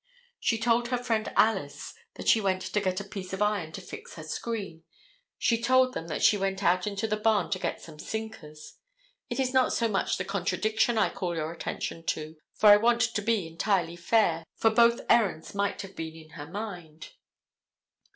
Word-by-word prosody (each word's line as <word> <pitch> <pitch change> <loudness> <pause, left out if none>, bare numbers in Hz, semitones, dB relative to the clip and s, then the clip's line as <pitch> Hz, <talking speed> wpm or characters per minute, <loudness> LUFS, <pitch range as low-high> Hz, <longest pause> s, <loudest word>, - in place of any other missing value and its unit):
She 225 - +1
told 235 +1 +2
her 250 0 0
friend 230 -3 -1
Alice 195 -10 +1 0.2
that - - -7
she 225 - +5
went 185 -2 0
to 210 - -1
get 185 -1 -1
a - - -5
piece 195 -2 -8
of 190 - -4
iron 205 -6 -1
to 195 - -6
fix 180 - -10
her 155 - -8
screen. 190 0 -5 0.6
She 230 -1 +1
told 255 +1 +4
them 165 - -5
that 155 - -3
she 210 - +6
went 195 0 -2
out 180 +2 +2
into 200 +1 -2
the 215 0 -1
barn 215 -1 +1
to 185 - 0
get - - -3
some 155 -2 -12
sinkers. 165 -10 -7 0.5
It - - -3
is 260 -1 0
not 260 -1 +3
so 230 - +1
much 200 -3 0
the 185 - -3
contradiction 200 +5 0
I 215 - +3
call 175 -2 -3
your 160 0 -3
attention 165 0 -5
to, 155 +1 -3 0.2
for 215 - +5
I 205 - +10
want 235 +2 +2
to 230 -2 +1
be 215 -3 +1
entirely 170 +1 0
fair, 170 -2 +2
for 225 - +3
both 235 +1 +4
errands 200 -9 +2
might 200 0 -1
have 195 0 -11
been 160 0 -6
in 160 -1 -14
her 145 -2 -9
mind. 175 -5 -7
200 Hz, 200 wpm, -28 LUFS, 170-225 Hz, 0.6 s, I